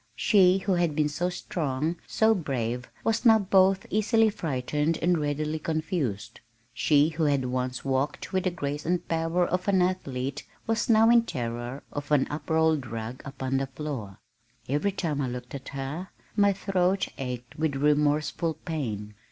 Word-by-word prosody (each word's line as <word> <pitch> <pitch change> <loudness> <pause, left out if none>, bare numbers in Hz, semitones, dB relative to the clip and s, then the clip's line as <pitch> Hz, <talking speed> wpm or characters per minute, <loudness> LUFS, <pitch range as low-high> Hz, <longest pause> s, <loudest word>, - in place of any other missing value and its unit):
She 190 -4 +5
who 195 +1 -2
had 175 -4 +1
been 150 -1 +2
so 175 +4 -1
strong, 160 -3 -2
so 220 0 +3
brave, 125 - -3
was 225 +1 +1
now 225 -3 +7
both 190 -1 +3
easily 220 +1 +3
frightened 150 -1 -1
and 175 +1 +2
readily 150 +1 -1
confused. 155 - -2 0.3
She 145 +5 +3
who 160 0 -1
had 140 -3 +2
once 125 0 -2
walked 135 +5 -1
with 185 0 0
the - - +3
grace 145 -4 -4
and 175 +2 -1
power 165 +2 +1
of 180 +2 -2
an 195 -2 +4
athlete 140 -8 -1 0.2
was 225 +1 0
now 225 0 +6
in 235 0 +7
terror 120 - -4
of 145 0 -5
an 145 -3 +4
up 150 - -6
rolled 160 -4 +2
rug 115 +2 -6
upon 135 -1 -2
the 135 0 -1
floor. 130 -8 -6 0.5
Every 150 +9 +1
time 160 -7 -2
I 135 - 0
looked 125 0 -6
at 135 -1 -7
her 140 +7 -5 0.3
my 200 -1 +5
throat 190 -1 +1
ached 125 +1 -6
with 155 -3 0
remorseful 150 +3 +1
pain. 110 - -4
150 Hz, 165 wpm, -27 LUFS, 135-180 Hz, 0.5 s, now